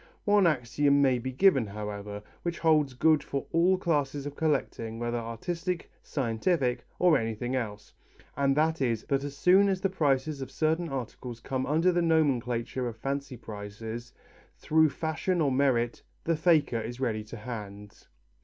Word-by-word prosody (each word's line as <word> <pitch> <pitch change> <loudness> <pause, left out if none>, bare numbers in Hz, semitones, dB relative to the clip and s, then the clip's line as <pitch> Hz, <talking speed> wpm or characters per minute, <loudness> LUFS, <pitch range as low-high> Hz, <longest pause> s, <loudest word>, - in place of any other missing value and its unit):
One 205 -3 +5
axiom 140 0 +2
may 130 -3 +3
be 130 +2 -4
given, 135 - +4
however, 105 0 -6 0.2
which 170 0 -3
holds 155 -5 +2
good 155 +3 +4
for 140 -1 -4
all 175 +3 +4
classes 145 -6 -1
of 145 0 -6
collecting, 135 -8 -1
whether 120 0 -2
artistic, 165 - -4
scientific, 125 0 -1
or 175 -5 +4
anything 115 +3 -3
else, 105 -4 -4 0.4
and 140 0 +1
that 160 0 +2
is 115 -4 0
that 140 0 +1
as 140 -1 -6
soon 190 +5 +5
as 190 -1 0
the 195 - +1
prices 145 -4 0
of 130 - -5
certain 160 +3 0
articles 125 -2 -6
come 130 +1 -3
under 160 +5 +3
the 175 0 +1
nomenclature 130 -6 +1
of 115 -1 -6
fancy 140 +1 -4
prices, 110 +2 -7 0.5
through 160 0 +3
fashion 160 +4 -1
or 145 -4 +2
merit, 130 -3 +1 0.2
the 165 - +1
faker 155 -7 +3
is 120 +3 -6
ready 110 -5 -1
to 115 +2 -9
hand. 105 -3 -8
135 Hz, 160 wpm, -28 LUFS, 115-160 Hz, 0.5 s, One